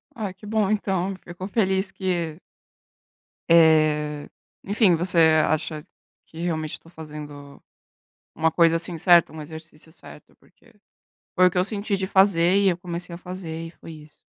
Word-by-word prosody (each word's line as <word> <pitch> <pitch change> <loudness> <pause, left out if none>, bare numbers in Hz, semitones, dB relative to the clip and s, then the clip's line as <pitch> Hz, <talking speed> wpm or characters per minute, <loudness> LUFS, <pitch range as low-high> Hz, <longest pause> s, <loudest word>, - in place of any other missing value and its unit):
Ah, 210 -5 -5
que 190 - -16
bom 210 -2 0
então, 195 -2 -1
fico 175 +2 -8
feliz 190 -2 0
que 175 -4 -3 1.1
Eh, 155 -2 +3 0.3
enfim, 200 -3 +3
você 175 +2 +1 0.3
acha 155 0 -2 0.4
que 160 - -13
realmente 160 -3 -3
eu - - -29
tô 165 - -17
fazendo 150 -3 -11 0.7
uma 160 0 +1
coisa, 165 0 +3
assim, 170 0 +1
certa, 175 0 +4
um 155 -1 -8
exercício 160 +1 -12
certo? 160 - -15
Porque - - -26 0.6
foi 185 - +5
o - - -7
que 180 - -2
eu 180 - +3
senti 205 0 -2
de 190 0 -3
fazer 190 -2 +3
e 200 -1 +3
eu 175 -2 0
comecei 175 0 -7
a - - -8
fazer 175 -3 -7
e - - -9
foi 165 - -13
isso. 150 -1 -15
170 Hz, 165 wpm, -23 LUFS, 160-190 Hz, 1.1 s, foi